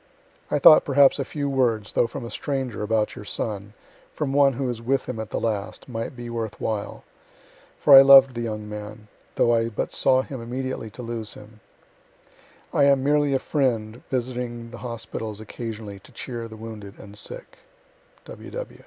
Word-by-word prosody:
I - - +1
thought 155 +2 +8
perhaps 140 -1 +4
a - - +1
few 145 -2 -4
words, 120 -6 0
though 120 - +3
from 120 - -7
a 115 - -7
stranger, 135 -6 -3
about 110 0 0
your - - -8
son, 105 -1 -4 0.4
from 145 -3 -2
one 140 -1 +5
who 135 +3 -3
was 120 -3 -3
with 135 +4 0
him 125 -3 -4
at 110 -1 -5
the - - -2
last, 105 -3 -3
might 115 0 -5
be 120 0 -7
worth 115 -2 -4
while 105 -2 -3 0.7
for 145 - +7
I 135 - +12
loved 135 -1 +8
the 120 - -4
young 105 -2 -4
man, 105 0 -8 0.3
though 120 - +3
I 115 0 +1
but 105 - -4
saw 130 0 +3
him 130 -3 -7
immediately 125 -1 -4
to 125 +4 -9
lose 115 -2 -5
him. 110 +1 -14 1.1
I 140 - +4
am 140 -1 +4
merely 145 -1 +2
a - - +4
friend 120 -6 -1
visiting 120 -2 -3
the 120 - -9
hospitals 115 -3 -6
occasionally 110 -2 -7
to - - -18
cheer 120 -3 -6
the 110 -1 -11
wounded 110 -3 -9
and 100 0 -12
sick. - - -7
115 Hz, 180 wpm, -24 LUFS, 110-135 Hz, 1.1 s, I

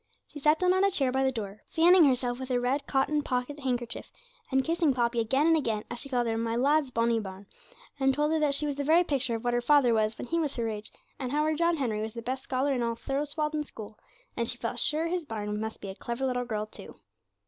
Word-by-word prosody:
She 295 - -11
sat 300 +2 +4
down 365 +1 +3
on 375 +1 +2
a 395 - +5
chair 275 -9 +1
by 265 +1 +1
the 265 - +2
door, 210 -4 -6
fanning 345 +1 +6
herself 250 -2 +1
with 260 0 -6
her 250 -1 +1
red 265 +4 -1
cotton 290 +2 +1
pocket 260 +2 -3
handkerchief, 245 -3 -3 0.4
and 265 0 +3
kissing 325 -3 +1
Poppy 235 -1 +1
again 265 +6 +2
and 330 0 +5
again, 225 -8 -1
as - - -4
she 275 - -1
called 245 -2 +1
her 225 -1 -1
'my 230 0 -1
lad's 280 +3 +2
bonny 230 -1 +1
bairn,' 190 -1 -8 0.5
and 270 0 +3
told 295 +3 +1
her 320 - +2
that 295 -2 +2
she 300 - +1
was 285 -1 -2
the 285 - -1
very 325 +5 +5
picture 265 -7 0
of 225 - -5
what 240 0 0
her 240 - +1
father 260 -2 +4
was 215 0 +1
when - - -5
he 335 +7 -1
was 300 -4 -1
her 235 -2 -1
age, 215 -1 -5 0.3
and 255 -3 -3
how 300 +1 +1
her 310 +1 +1
John 335 +2 +1
Henry 225 -7 -1
was 220 +1 -5
the 230 - -6
best 260 +3 -3
scholar 270 +2 0
in 250 - -1
all 230 -1 -1
Thurswalden 300 +4 -2
School, 215 -6 -10 0.4
and - - -1
she - - -4
felt - - -3
sure 310 +2 +2
his 345 0 -2
bairn 210 -2 -3
must 220 0 -5
be 195 - -6
a - - -5
clever 235 +6 -4
little 250 -1 -1
girl 215 -3 -2
too. 215 - -12
260 Hz, 260 wpm, -28 LUFS, 230-295 Hz, 0.5 s, fanning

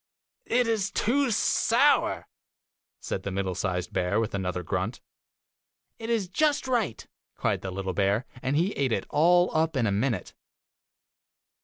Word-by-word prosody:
'It 245 +1 +2
is 220 -4 0
too 265 +4 +1
sour,' 220 - +2 0.7
said - - -4
the - - -4
middle 95 -1 -2
sized 90 -1 -3
bear, 95 +3 +1
with 115 0 -2
another 90 -2 -2
grunt. 95 +6 -2 1.0
'It 225 0 -6
is 225 -5 0
just 295 - +1
right!' 225 - -1 0.3
cried - - -1
the 95 - -5
little 95 0 -4
bear, 100 +5 +1 0.2
and 135 +2 -1
he 180 +5 +2
ate 135 - -1
it - - -1
all 175 +4 +4
up 160 -2 +1
in 120 - +2
a 100 - +1
minute. 105 0 -1
130 Hz, 150 wpm, -27 LUFS, -, 1.0 s, all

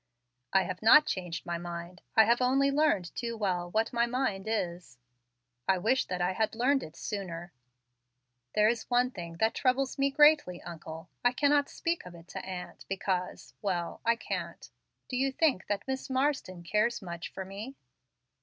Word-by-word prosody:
"I 190 - +4
have 185 -1 -5
not 300 +8 +8
changed 180 -3 -3
my 170 -1 -2
mind. 175 +1 -7
I 220 - +8
have 235 +3 +3
only 270 +2 +3
learned 275 - +1
too 235 -2 -3
well 180 -4 -1
what 220 +5 0
my 235 0 +2
mind 235 -6 -1
is. 175 - -3 0.7
I 190 - +4
wish 235 +8 +2
that 180 -1 -3
I 180 +1 +2
had 220 +2 0
learned 265 +4 +3
it 155 - -9
sooner. 175 -4 -5 1.0
There 210 0 +5
is 230 0 -1
one 245 +1 +3
thing 170 -6 -7
that 220 +5 +2
troubles 265 +1 +1
me 275 0 +3
greatly, 295 - +5
uncle. 165 0 -8
I 245 0 +4
cannot 285 +1 +3
speak 335 0 -2
of 175 - -11
it 170 0 -14
to 190 - -6
aunt, 185 -1 -7
because 190 -1 -2
Well, 180 -4 -2
I 230 0 +3
can't. - - -5 0.4
Do 255 - -4
you 270 +2 +1
think 270 - +1
that 205 +2 -2
Miss 265 +1 -3
Marsden 260 -10 0
cares 215 +5 +1
much 170 -2 -6
for 190 - -6
me? 205 +8 -7
210 Hz, 175 wpm, -30 LUFS, 180-255 Hz, 1.0 s, not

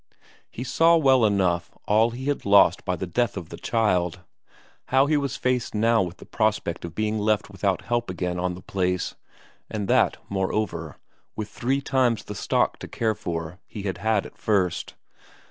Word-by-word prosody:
He 125 - -6
saw 165 +6 +4
well 135 -5 +4
enough 90 -4 +1 0.2
all 110 +2 +4
he 125 +3 -7
had 145 0 -1
lost 100 0 +5
by - - 0
the - - -4
death 100 +5 0
of 85 -4 -6
the - - -8
child; 90 -6 0 0.6
how 135 +1 +4
he 150 +1 +2
was 140 -2 -1
faced 125 -3 -1
now 115 +2 +3
with 90 -1 -4
the - - -13
prospect 105 -6 -1
of 85 -1 -7
being 110 0 0
left 105 -1 0
without 95 -1 -1
help 120 -2 -1
again 90 -1 -2
on 90 0 -1
the 90 - -12
place 90 -1 -1 0.6
and 105 -2 -3
that, - - +3
moreover, 100 +1 -2 0.4
with 110 -1 -4
three 130 +5 -1
times 130 -4 +1
the 105 - -7
stock 100 - 0
to - - -7
care 110 -2 0
for 85 -4 -5
he 105 - -7
had 95 -3 -3
had 110 0 +1
at - - -13
first. 95 -5 0
105 Hz, 180 wpm, -25 LUFS, 90-120 Hz, 0.6 s, lost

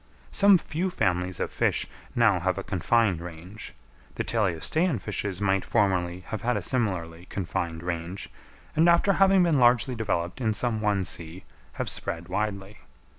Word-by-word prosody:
Some 200 -1 +6
few 175 +2 -3
families 90 - -1
of - - -2
fish - - +1 0.3
now 115 -6 +4
have 95 +2 0
a 95 - -3
confined 100 -1 +1
range; 90 +5 -9 0.4
the - - -2
teleostean 115 - +1
fishes 95 -2 -4
might 95 -2 +1
formerly 90 -3 0
have 110 +3 -6
had 120 +2 0
a - - -2
similarly 90 -8 -2
confined 85 -3 -3
range, 85 +2 -4 0.5
and 165 +2 +5
after 170 +4 +4
having 195 -1 +5
been 165 -5 +3
largely 120 +1 +4
developed 100 -3 -2
in 110 -3 +1
some 110 0 -1
one 105 -3 +1
sea, 85 +3 -4 0.3
have - - -4
spread 85 +2 -3
widely. 100 +1 -3
100 Hz, 155 wpm, -26 LUFS, 90-120 Hz, 0.5 s, Some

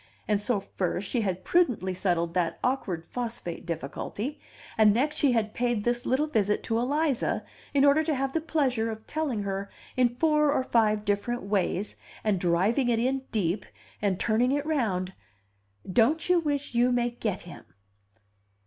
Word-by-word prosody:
And 210 -1 +1
so 215 0 +1
first 190 0 -3
she 245 - 0
had 185 -3 -2
prudently 250 - +2
settled 175 -2 0
that 170 -2 0
awkward 200 -10 -1
phosphate 230 -8 -5
difficulty, 200 - -4 0.4
and 215 -1 +5
next 300 +5 +1
she 275 -4 +3
had 215 -2 0
paid 240 -3 0
this 240 +2 -1
little 265 +4 +2
visit 210 -8 0
to 225 0 0
Eliza 285 +1 0 0.3
in 280 0 +4
order 285 +2 +5
to 310 - +1
have 270 0 -1
the 325 - 0
pleasure 260 -8 0
of 220 0 -7
telling 285 -9 -2
her 195 0 -3 0.3
in 250 -1 +4
four 300 +4 +2
or 285 - +1
five 215 -4 +2
different 205 +4 -1
ways, 200 0 -1 0.3
and 210 -4 +1
driving 190 +9 +2
it 235 - +2
in 260 +3 0
deep, 195 -2 0 0.4
and 195 -3 0
turning 235 +3 +2
it 290 +1 0
round: 200 -12 0 0.7
"Don't 240 - +2
you 360 -1 +5
wish 290 -4 -2
you 240 +1 +3
may 240 -1 +1
get 215 -5 -3
him?" 175 - -11
230 Hz, 165 wpm, -27 LUFS, 200-270 Hz, 0.7 s, and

